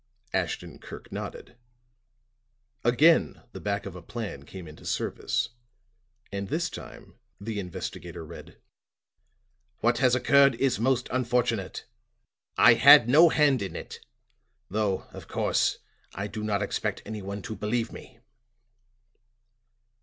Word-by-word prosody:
Ashton - - -3
Kirk - - -11
nodded. 120 - -7 1.3
Again 125 - +4
the - - -8
back 100 0 -2
of 95 -2 -7
a 90 - -8
plan 105 - -6
came 95 -3 -9
into 75 0 -13
service - - -2 0.8
and 100 0 -4
this 165 - -1
time - - -11 0.2
the 105 +1 -4
investigator 90 -3 -6
read. - - -12 1.2
"What 120 +1 +2
has 125 -1 +4
occurred 140 0 +5
is 130 -3 0
most 130 +1 +1
unfortunate. 120 -5 -1 0.7
I - - +8
had 120 - +8
no 155 +7 +7
hand 145 -6 +3
in 100 - -5
it, - - -8 0.7
though, 105 -2 0
of - - -10
course, - - +1 0.4
I 100 - -3
do 105 +1 -6
not 105 -1 0
expect 100 - -3
anyone 100 -2 -6
to 110 - -5
believe 115 +3 -2
me." 130 - -12
110 Hz, 125 wpm, -27 LUFS, 100-130 Hz, 1.3 s, I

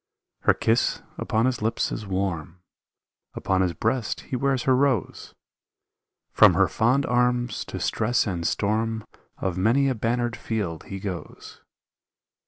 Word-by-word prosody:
Her - - +5
kiss 115 +2 +1 0.2
upon 110 +2 +1
his 130 -3 0
lips 110 +2 0
is 105 - -5
warm, 90 -2 -3 0.7
Upon 95 -1 0
his 90 -2 +1
breast 115 -1 -1
he 135 - -5
wears 135 0 0
her 130 - +4
rose. 135 -2 0 1.0
From - - +6
her - - +4
fond 130 +5 +2
arms 125 0 +1
to - - -6
stress 115 +3 +1
and 90 -5 -3
storm 110 +1 -1 0.3
Of 95 -1 -2
many 125 +8 +3
a - - +1
bannered 120 +1 -1
field 100 -10 -4
he 95 - -6
goes. 95 -5 -7
115 Hz, 140 wpm, -25 LUFS, 95-125 Hz, 1.0 s, From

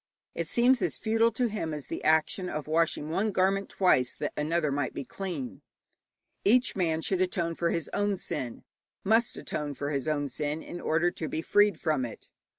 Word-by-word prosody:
It 170 - -3
seems 245 +4 +4
as - - +1
futile 225 +1 +2
to 245 +2 +1
him 165 -8 -3
as 150 - -6
the - - -6
action 160 +4 +2
of 150 -1 -4
washing 155 -1 0
one 205 +6 +1
garment 195 +1 +1
twice 130 -10 +2
that 150 - -3
another 155 0 0
might 140 -1 -2
be - - -3
clean. 170 -9 -5 0.8
Each 245 +5 +4
man 165 -4 0
should 190 -2 0
atone 175 -2 0
for 170 +1 0
his 165 -1 -1
own 205 -1 +1
sin, 135 -10 -4 0.4
must 225 +4 +3
atone 145 -2 -4
for 145 +2 -3
his 140 -1 -2
own 145 -2 0
sin, 150 +3 -3
in 175 - -7
order 165 +3 +2
to 160 -3 -5
be 160 - -3
freed 205 +1 +3
from 155 -5 +1
it. 120 - -7
165 Hz, 190 wpm, -29 LUFS, 150-195 Hz, 0.8 s, seems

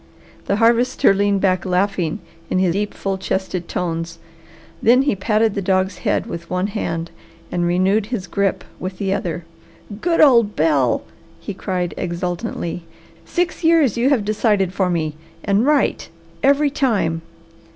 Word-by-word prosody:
The 200 - +2
Harvester 230 -1 +3
leaned 200 0 +1
back 185 -2 +2
laughing 180 -3 0 0.3
in 185 -1 +2
deep, 205 +3 -2
full 195 -1 -3
chested 190 -2 -3
tones; 165 -1 -3 0.6
then 250 +4 +5
he 280 -6 +1
patted 215 +2 +1
the 200 - -2
dog's 190 0 0
head 205 - 0
with 170 -6 -7
one 180 +1 0
hand 165 -5 -3 0.4
and 175 -1 0
renewed 190 +4 +2
his 225 -6 -3
grip 200 0 -1 0.2
with 185 0 -5
the 195 0 -1
other. 175 -4 -3 0.6
"Good 340 -1 +1
old 235 -8 +5
Bel!" 145 -6 +2 0.4
he 205 - -6
cried 180 -2 -3
exultantly. 175 -1 -3 0.4
"Six 355 0 -2
years 320 -8 +4
you 240 +3 +2
have 250 -8 +2
decided 205 -3 +1
for 190 -2 +1
me, 155 -3 -2 0.3
and 205 +6 +2
right 295 -2 +1 0.3
every 280 +4 +3
time! 205 - 0
195 Hz, 145 wpm, -20 LUFS, 180-225 Hz, 0.6 s, then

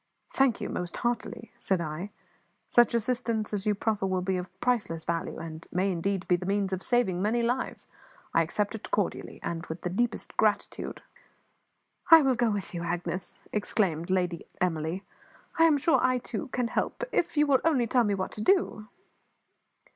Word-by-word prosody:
"Thank 270 -4 +3
you, - - -3
most 175 -1 -4
heartily," 240 -1 -3
said 190 -2 +1
I. 170 +4 -4 0.6
"Such 240 -1 +5
assistance 230 -2 -1
as 205 0 -1
you 210 - +3
proffer 210 -1 0
will 185 -1 0
be 190 0 0
of 180 0 -4
priceless 210 -10 0
value, 165 0 -2
and 160 0 -8
may 190 +2 +1
indeed 185 +2 -1
be 180 - +4
the 180 +1 -5
means 195 -1 0
of 185 - -2
saving 215 -8 +1
many 230 +4 +1
lives. 245 +3 -1 0.5
I 165 - +5
accept 205 +6 -1
it 220 - -7
cordially, 205 -3 -2
and 165 -1 -3
with 160 +2 -6
the 180 - -3
deepest 235 +5 -1
gratitude." 215 -1 0 1.1
"I 325 -2 +10
will 265 -1 +3
go 240 -1 +2
with 205 -3 -3
you, 170 - -3
Agnes," 175 +1 -3
exclaimed 190 -6 0
Lady 180 -2 0
Emily; 165 +1 -1 0.6
"I 330 - +8
am 315 -3 +5
sure 290 +4 +3
I, 255 0 +3
too, 255 +4 -4
can 250 -2 -1
help, - - -2
if 330 - 0
you 295 - +5
will 275 -3 +3
only 285 -7 +3
tell 245 +1 +3
me 205 -2 +1
what 190 -1 -3
to 210 - -7
do." 285 - +2
205 Hz, 180 wpm, -28 LUFS, 180-240 Hz, 1.1 s, I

